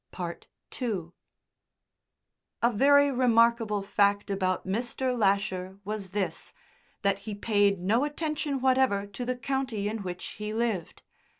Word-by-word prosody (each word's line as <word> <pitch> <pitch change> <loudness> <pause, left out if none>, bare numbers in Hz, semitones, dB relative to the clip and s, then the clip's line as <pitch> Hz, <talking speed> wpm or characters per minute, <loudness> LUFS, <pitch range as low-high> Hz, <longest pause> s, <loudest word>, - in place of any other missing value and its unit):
II 175 -1 -2 2.3
A 235 +1 +4
very 285 +5 +5
remarkable 230 -4 +3
fact 200 0 +1
about 185 -2 0
Mr. 240 +5 -1
Lasher 195 -3 0
was 210 -2 -4
this 195 0 -3 0.5
that 200 -1 +2
he 205 +1 -6
paid 205 -2 +2
no 215 +8 +2
attention 295 -2 -2
whatever 260 -6 +3
to 200 +4 -7
the 255 +1 -1
county 250 -4 -2
in 220 +2 -3
which 180 -1 -6
he 210 +1 -4
lived. 225 -7 -2
210 Hz, 120 wpm, -28 LUFS, 200-250 Hz, 2.3 s, very